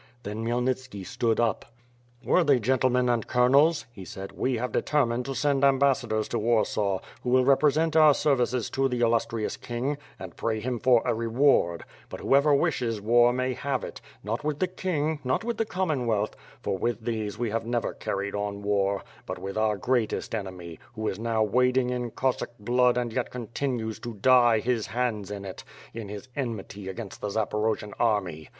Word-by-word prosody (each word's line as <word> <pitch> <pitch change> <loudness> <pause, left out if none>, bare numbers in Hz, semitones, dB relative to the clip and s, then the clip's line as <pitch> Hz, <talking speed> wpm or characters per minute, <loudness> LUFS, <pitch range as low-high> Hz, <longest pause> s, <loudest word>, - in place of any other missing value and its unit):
Then 110 +1 -4
Khmyelnitski 125 -3 -2
stood 115 +1 0
up: 115 0 -1 0.5
"Worthy 145 -8 +4
gentlemen 125 +1 +2
and 120 -2 0
colonels," 140 +6 +4
he 95 - -9
said, 95 +2 -8
"we 130 -1 -1
have 125 +2 -3
de - - +1
tennined 125 -5 +1
to 135 - -4
send 140 +1 +1
ambassadors 135 -5 +2
to 120 - -1
Warsaw, 105 -3 +1 0.2
who - - -3
will 130 0 +4
repre 140 +2 +5
sent 160 +2 0
our 155 -3 +7
services 125 -4 +1
to 135 0 +1
the 125 -1 -2
illustrious 115 -1 0
King, 130 +4 -3 0.2
and - - -9
pray 110 -1 -1
him 120 +2 -3
for 120 -1 +4
a - - +2
reward; 115 - +2 0.3
but - - -7
whoever 140 +2 +3
wishes 115 -5 0
war 120 +3 +4
may 130 +1 -1
have 135 0 -2
it - - -7
— - - -29
not 110 +6 -3
with 150 -1 -1
the 185 - +1
king, 160 -5 -2
not 130 - 0
with 235 -1 -2
the 225 - +1
Commonwealth, 130 - -1 0.3
for 95 - -2
with 115 0 -2
these 110 -3 -2
we 120 -2 -2
have 115 +1 -2
never 120 -1 -1
carried 100 +1 -3
on 100 0 -3
war, 100 -1 +1 0.2
but - - -4
with 95 0 -6
our 110 -1 +1
greatest 120 +2 -1
enemy, 90 -6 -6 0.2
who 110 -1 -3
is 95 - -3
now 115 -1 +1
wading 125 +3 +2
in 125 -1 -2
Cossack 130 +3 -1
blood 125 +3 +2
and 120 -2 -1
yet 125 0 -1
continues 120 -1 -3
to 120 -2 -7
dye 120 0 +5
his 120 -2 -1
hands 115 -5 -2
in 100 -1 -6
it, 95 - -8 0.3
in 110 -3 -6
his 105 +4 -7
enmity 105 -6 -5
against 105 +1 -7
the - - -2
Zaporojian 105 0 -1
army. 95 -9 0
120 Hz, 185 wpm, -27 LUFS, 105-130 Hz, 0.5 s, our